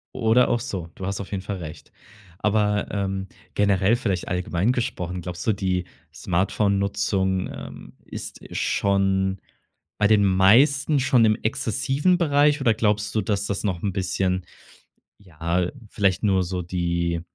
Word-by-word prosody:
Oder 125 0 +3
auch 120 - +1
so, 90 -7 -5
du 95 - -6
hast 100 +1 -3
auf 100 - -9
jeden 95 -2 -3
Fall 100 0 -4
recht. 80 -2 -9 0.5
Aber, 105 -1 +1
ähm, 95 -1 -2 0.3
generell 100 +1 +3
vielleicht 100 -7 -2
allgemein 90 +4 0
gesprochen, 90 -8 -3
glaubst 90 0 -6
du, 110 - +4
die 90 -2 -1 0.3
Smartphonenutzung, 100 0 0
ähm, - - -10
ist - - -7 0.2
schon 95 -1 +1 0.6
bei 105 - +4
den 105 -1 +4
meisten 135 +10 +4
schon 125 -3 +3
im 110 -1 +4
exzessiven 135 - +1
Bereich 150 -3 +3
oder 115 -4 +4
glaubst 105 -1 0
du, 110 - +2
dass 100 0 -1
das 100 - -2
noch 95 -5 -2
'n 100 -2 -1
bisschen 95 -1 -1 0.7
ja, 85 -1 -2 0.2
vielleicht 95 -1 +1
nur 95 -2 +3
so 90 +1 -3
die 85 -1 -1
100 Hz, 145 wpm, -24 LUFS, 90-110 Hz, 0.7 s, du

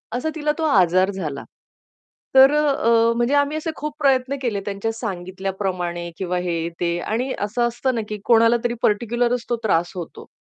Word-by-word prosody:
असा 250 +6 -1
तिला 300 -1 0
तो 325 - -2
आजार 185 - +3
झाला. 155 -8 -5 0.9
तर 265 +1 +8
अ, 300 0 +2
अ, 230 -4 +3
म्हणजे 240 +3 +1
आम्ही 285 +2 +1
असे 315 +1 -3
खूप 300 +1 -5
प्रयत्न 270 -2 +2
केले 230 -6 -1
त्यांच्या 205 +2 -2
सांगितल्याप्रमाणे 185 -4 -4
किंवा 180 -1 -2
हे, 175 -1 -2 0.2
ते. 170 0 0
आणि 235 +8 -2
असं 235 +4 0
असतं 240 +2 -2
ना, 230 - -1
की 210 - -4
कोणाला 230 0 +5
तरी 240 -1 0
पार्टिक्युलरच 235 +3 +1
तो 240 - +2
त्रास 175 -5 +1
होतो. 175 -3 -8
225 Hz, 175 wpm, -22 LUFS, 185-255 Hz, 0.9 s, तर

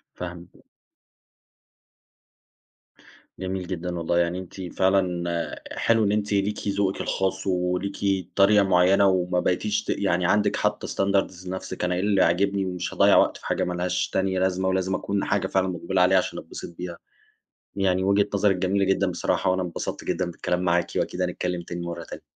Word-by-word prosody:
فاهمِك. 90 0 -9 2.8
جميل 95 -1 -4
جدًا، 90 -1 -4
والله 85 +1 0
يعني 85 +1 0
أنتِ 95 +1 -9 0.2
فعلًا 90 -3 +1 0.2
حلو 115 -1 +2
إن 100 - +2
أنتِ 105 -1 0
ليكِ 100 +1 -1
ذوقِك 100 -1 0
الخاص 95 0 -1
وليكِ 95 +1 -1
طريقة 100 +1 +5
معينة 95 +1 +4
وما 90 -1 +1
بقيتيش 105 +4 0
ت - - -11
يعني 90 -3 +1
عندِك 105 +2 +2
حاطة 105 0 -1
standards 95 -2 -1
لنفسِك 95 0 -5
"أنا 90 0 +1
إيه - - -1
اللي 100 -1 +2
عاجبني، 100 +3 +1
ومش 90 -1 -4
هاضيّع - - +5
وقت - - +3
في - - -16
حاجة - - 0
مالهاش 90 0 -1
تانية 95 -1 0
لازمة، 95 0 0
ولازم 95 0 0
أكون 100 0 -2
حاجة 95 -1 0
فعلًا 95 0 +1
مُقبلة 90 +1 -1
عليها 95 +1 +5
عشان 90 - -1
أتبسط 85 - -9
بيها." 90 -1 -6 0.8
يعني 95 -1 +1
وجهة 100 +1 +3
نظرِك 100 -1 +3
جميلة 95 +2 +1
جدًا 95 0 +1
بصراحة، 90 - 0
وأنا 95 0 +1
انبسطت 85 -2 -5
جدًا 90 - -1
بالكلام 90 +1 -2
معاكِ، 85 -1 +2
وأكيد 90 - -1
هنتكلم 90 -1 -2
تاني 85 0 -6
مرة 85 - -5
تانية. - - -9
95 Hz, 165 wpm, -25 LUFS, 90-100 Hz, 2.8 s, طريقة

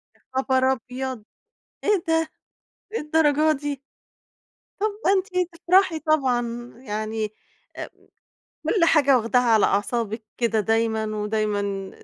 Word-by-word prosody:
يا - - -30
خبر 260 0 +2
أبيض! 255 -1 -4 0.6
إيه 415 -4 +2
ده، 325 -1 +1 0.7
للدرجة 305 -1 +3
دي؟! 285 -1 -4 1.0
طَب 425 - +2 0.2
ده 380 - +5
أنتِ 365 -2 0
تفرَحي 345 0 +3
طبعًا، 245 -6 0
يعني 215 -2 -3 0.5
امم، - - -5 0.8
كلّ 390 -6 +3
حاجة 285 -5 +5
واخداها 240 +2 +2
على 225 -3 +4
أعصابِك 220 +2 -1
كده 225 -2 +1
دايمًا 225 +1 +1
ودايمًا 205 -2 -2
255 Hz, 110 wpm, -24 LUFS, 220-315 Hz, 1.0 s, ده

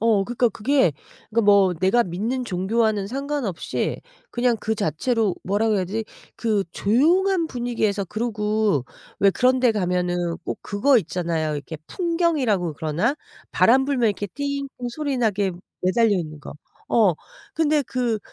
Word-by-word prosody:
어 220 -3 +3
그니까 240 +2 +1
그게 230 - +2 0.4
그니까 230 +1 +2
뭐 200 -2 +5
내가 190 +8 +3
믿는 225 +8 -3
종교와는 210 +1 0
상관없이 270 - -3 0.3
그냥 240 - +1
그 220 - -1
자체로 210 +2 0
뭐라고 210 +3 +1
해야 190 - 0
되지? 215 +5 -3 0.3
그 215 -4 0
조용한 335 - +2
분위기에서 235 -6 -1
그러고 210 - 0 0.4
왜 200 -1 +6
그런 255 +6 +2
데 250 - +4
가면은 180 -3 -1
꼭 - - -4
그거 240 +6 +3
있잖아요. 165 -3 -2
이렇게 150 +2 -6
풍경이라고 310 - 0
그러나? 160 - 0 0.4
바람 260 +3 +4
불면 265 -5 +1
이렇게 205 0 -2
띵띵 280 +4 -4 0.2
소리 285 +1 -2
나게 205 -5 +1 0.3
매달려 225 +5 +3
있는 155 -3 -6
거. - - -9 0.4
어. 215 -6 +4 0.4
근데 305 -2 +2
그 245 -4 -1
220 Hz, 310 characters per minute, -23 LUFS, 190-255 Hz, 0.4 s, 왜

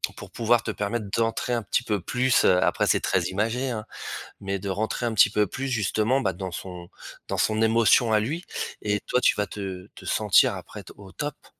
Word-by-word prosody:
pour - - -10
pouvoir 115 0 +2
te 110 - -2
permettre 105 +1 -3
d'entrer 115 +2 0
un 120 -2 0
petit 115 +5 0
peu 105 -4 -1
plus. 125 +6 +2
Heu, 90 -1 +4
après - - +1
c'est - - +3
très 95 -2 +1
imagé, 110 +8 -1
hein, 110 -2 -4 0.6
mais 100 0 -3
de 100 +1 -5
rentrer 110 +4 -1
un 115 - -1
petit 105 - +6
peu 105 -2 +2
plus 135 +7 -4
justement, 115 +3 +1
bah, 95 -3 0
dans 95 0 -6
son 90 -1 -8 0.4
dans - - -3
son 110 0 +1
émotion 115 0 +4
à 105 - +5
lui 150 +11 -3 0.4
et 105 -1 0
toi 125 - +2
tu - - +5
vas 105 -1 -1
te 95 -2 -6
te - - -12
sentir 105 -3 +4
après - - -9
te - - -13
au 95 -2 -13
top. 145 -1 -6
110 Hz, 215 wpm, -25 LUFS, 100-120 Hz, 0.6 s, petit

